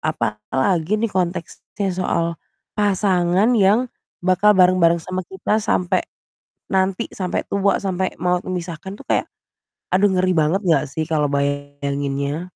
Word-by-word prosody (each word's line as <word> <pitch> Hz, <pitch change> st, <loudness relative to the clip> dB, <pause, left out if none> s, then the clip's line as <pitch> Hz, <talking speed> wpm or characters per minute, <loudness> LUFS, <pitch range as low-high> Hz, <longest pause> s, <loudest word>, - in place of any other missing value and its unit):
Apalagi 155 Hz, -, -1 dB
nih 220 Hz, 0 st, -1 dB
konteksnya 185 Hz, +2 st, -3 dB
soal 170 Hz, -2 st, -1 dB, 0.3 s
pasangan 195 Hz, 0 st, +2 dB
yang 215 Hz, +2 st, +4 dB, 0.4 s
bakal 190 Hz, +3 st, +4 dB
bareng-bareng 180 Hz, -2 st, +5 dB
sama 185 Hz, +3 st, -4 dB
kita 205 Hz, +3 st, -1 dB
sampai 185 Hz, -3 st, +1 dB, 0.7 s
nanti, 190 Hz, 0 st, +1 dB
sampai 185 Hz, -2 st, -2 dB
tua, 200 Hz, 0 st, +1 dB
sampai 190 Hz, -2 st, -2 dB
maut 180 Hz, +1 st, 0 dB
memisahkan 185 Hz, +1 st, -6 dB
tuh -, -, -13 dB
kayak, -, -, 0 dB, 0.7 s
aduh 200 Hz, +2 st, +4 dB
ngeri 185 Hz, -1 st, +1 dB
banget 160 Hz, +3 st, +2 dB
enggak 165 Hz, -3 st, +3 dB
sih 155 Hz, +3 st, -2 dB
kalau 150 Hz, -3 st, 0 dB
bayanginnya? 140 Hz, +1 st, -2 dB
180 Hz, 125 wpm, -21 LUFS, 160-190 Hz, 0.7 s, bareng-bareng